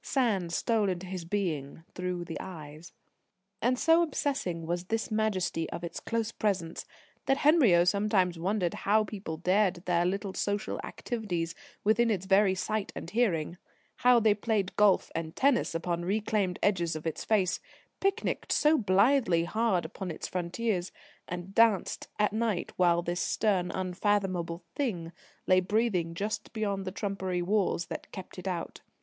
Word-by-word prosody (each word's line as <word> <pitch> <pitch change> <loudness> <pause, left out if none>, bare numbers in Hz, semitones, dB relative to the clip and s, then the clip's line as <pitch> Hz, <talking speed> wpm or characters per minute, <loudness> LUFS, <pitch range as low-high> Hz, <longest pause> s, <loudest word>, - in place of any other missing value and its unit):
Sand 210 -10 0
stole 215 +2 +1
into 180 0 -3
his 185 -2 -5
being 165 -6 -3
through 180 -1 -3
the 165 - -6
eyes. 155 -2 -9 0.7
And 250 +2 +2
so 325 +5 +5
obsessing 270 - -1
was 175 +2 -2
this 225 +3 -2
majesty 195 -6 0
of 170 - -6
its 170 -1 -5
close 230 -1 -2
presence, 185 -8 -2 0.4
that 270 - +3
Henriot 250 - +5
sometimes 195 -4 +1
wondered 185 0 0
how 215 +2 +2
people 195 -6 -6
dared 185 +1 +1
their 175 -1 +2
little 195 +2 -1
social 205 +1 -2
activities 180 -9 -3 0.3
within 230 +3 +3
its 190 -4 -1
very 195 0 +4
sight 210 +2 -2
and 170 - -7
hearing; 180 -7 0 0.4
how 245 0 +5
they 220 -2 +4
played 205 -2 -1
golf 205 -2 +4
and 160 -1 -4
tennis 265 -10 +2
upon 170 +1 -2
reclaimed 200 -1 0
edges 175 -5 +1
of 155 - -6
its 160 - -3
face, 195 -5 +1 0.4
picnicked 395 +3 -1
so 300 +1 +4
blithely 200 -3 +3
hard 215 0 +1
upon 190 -2 -6
its 160 - -5
frontiers, 185 +1 -2 0.4
and 180 +2 -6
danced 225 -3 +3
at 210 -1 +2
night 220 -5 -1
while 175 -1 +3
this 175 0 -2
stern, 190 -5 +1
unfathomable 185 -2 -1
Thing 180 - -2 0.3
lay 185 0 +5
breathing 185 -4 0
just 205 +5 -3
beyond 200 -3 -2
the 185 - -3
trumpery 190 -3 -2
walls 190 -2 +1
that - - -7
kept 190 -1 -8
it 180 - -7
out. 175 -3 -4
190 Hz, 155 wpm, -29 LUFS, 175-215 Hz, 0.7 s, so